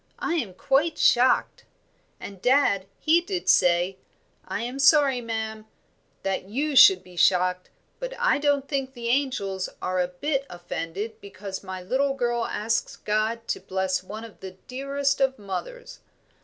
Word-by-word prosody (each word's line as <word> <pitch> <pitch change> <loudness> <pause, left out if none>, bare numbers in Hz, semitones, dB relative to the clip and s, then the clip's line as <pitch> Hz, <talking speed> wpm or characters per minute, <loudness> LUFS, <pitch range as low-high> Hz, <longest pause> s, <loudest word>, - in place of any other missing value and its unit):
I 340 - -2
am 210 - -3
quite 295 - +1
shocked,' 250 +2 +3 0.6
and 195 -2 -9
dad, 245 -8 +3
he 330 +2 +3
did 360 0 -4
say, 180 +2 +3 0.5
'I - - -3
am 250 +3 -5
sorry, 275 -2 +5
ma'am, 220 -1 -5 0.6
that 195 -1 -2
you 285 +6 -1
should 385 +8 +8
be 180 -1 -15
shocked, 180 +1 +2 0.3
but - - -5
I - - +2
don't 285 -1 +1
think 270 -2 -3
the 235 -1 -4
angels 235 -8 -1
are 185 0 -1
a 180 - 0
bit 275 +10 -2
offended 175 +4 -6
because 200 -1 -7
my 185 -1 -7
little 270 +7 0
girl 240 -2 0
asks 225 +2 -2
God 220 +2 -2
to - - -1
bless 190 0 -1
one 210 +4 -8
of 225 -2 -12
the 190 -1 -9
dearest 275 +2 -1
of 265 0 +2
mothers.' 225 - -7
230 Hz, 155 wpm, -25 LUFS, 190-275 Hz, 0.6 s, should